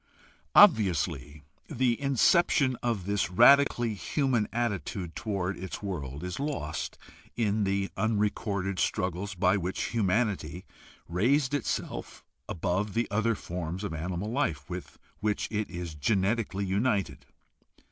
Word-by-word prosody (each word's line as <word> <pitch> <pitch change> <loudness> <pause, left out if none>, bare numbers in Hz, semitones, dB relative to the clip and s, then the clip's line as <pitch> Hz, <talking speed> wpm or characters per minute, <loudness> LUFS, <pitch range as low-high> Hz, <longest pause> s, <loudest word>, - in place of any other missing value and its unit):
Obviously 85 - +4 0.3
the 125 -1 0
inception 140 0 +3
of 115 -7 -1
this 100 -2 0
radically 120 +2 +5
human 120 +1 0
attitude 100 -6 -3
toward 95 -3 -2
its 95 +3 -6
world 75 -7 -5
is 90 +4 -4
lost 140 - -3 0.4
in 105 -2 +1
the 100 0 -1
unrecorded 100 -2 -1
struggles 95 +2 -1
by 90 +3 +3
which 95 0 -2
humanity 95 -6 0 0.4
raised 130 - +2
itself 145 -4 -3 0.3
above 95 +3 -1
the 115 +1 +1
other 110 +2 +1
forms 90 0 -5
of 100 -5 -3
animal 90 +6 -3
life 115 - -1
with 90 0 -7 0.2
which 105 0 -1
it 105 -1 -2
is 85 -2 -6
genetically 100 - 0
united. 95 - -1
100 Hz, 115 wpm, -29 LUFS, 90-115 Hz, 0.4 s, radically